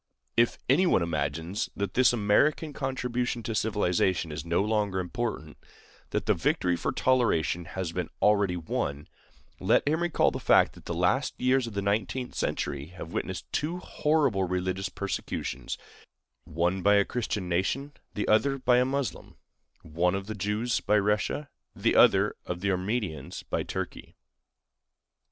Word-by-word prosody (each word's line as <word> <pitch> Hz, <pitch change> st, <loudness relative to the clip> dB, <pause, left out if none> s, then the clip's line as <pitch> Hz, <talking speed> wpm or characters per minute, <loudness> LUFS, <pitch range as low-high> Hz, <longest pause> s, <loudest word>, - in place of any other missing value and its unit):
If 115 Hz, 0 st, +3 dB
anyone 140 Hz, -, +4 dB
imagines 80 Hz, +4 st, -2 dB
that 100 Hz, -1 st, -3 dB
this 125 Hz, 0 st, +5 dB
American 120 Hz, +8 st, +2 dB
contribution 125 Hz, -3 st, -2 dB
to 115 Hz, -, -3 dB
civilization 95 Hz, -5 st, +1 dB
is 75 Hz, -, -5 dB
no 85 Hz, +3 st, +1 dB
longer 105 Hz, -3 st, 0 dB
important,—that 95 Hz, -5 st, -5 dB
the -, -, +4 dB
victory 90 Hz, -1 st, +1 dB
for -, -, -2 dB
toleration 100 Hz, -, +1 dB
has 90 Hz, -1 st, -4 dB
been 90 Hz, -1 st, -3 dB
already 100 Hz, -4 st, +3 dB
won,—let 75 Hz, -, -2 dB
him 160 Hz, +3 st, +1 dB
recall 175 Hz, -2 st, +2 dB
the -, -, -4 dB
fact -, -, +4 dB
that -, -, -16 dB
the -, -, -3 dB
last -, -, +1 dB
years 130 Hz, 0 st, +2 dB
of 110 Hz, -, -8 dB
the 100 Hz, -, -1 dB
nineteenth 105 Hz, +5 st, -1 dB
century 70 Hz, +1 st, -2 dB
have 90 Hz, 0 st, -9 dB
witnessed -, -, -3 dB
two 160 Hz, +4 st, -1 dB
horrible 150 Hz, -, +1 dB
religious 90 Hz, +1 st, -2 dB
persecutions, 100 Hz, +1 st, -4 dB, 0.7 s
one 85 Hz, +3 st, 0 dB
by 100 Hz, +2 st, +5 dB
a 100 Hz, -1 st, +4 dB
Christian 110 Hz, -6 st, -3 dB
nation, 110 Hz, +12 st, -1 dB, 0.2 s
the 105 Hz, -, -2 dB
other 135 Hz, +6 st, +3 dB
by 125 Hz, -1 st, +3 dB
a 125 Hz, -, +3 dB
Moslem—one, 90 Hz, -, -3 dB
of 95 Hz, 0 st, -3 dB
the 110 Hz, -, -5 dB
Jews 105 Hz, +4 st, -1 dB
by 105 Hz, +1 st, +2 dB
Russia, 105 Hz, +8 st, 0 dB, 0.3 s
and -, -, -14 dB
the -, -, +3 dB
other, -, -, +5 dB
of 90 Hz, 0 st, -4 dB
the 100 Hz, 0 st, +1 dB
Armenians 95 Hz, -3 st, -3 dB
by -, -, -2 dB
Turkey. -, -, -6 dB
100 Hz, 145 wpm, -28 LUFS, 90-125 Hz, 0.7 s, this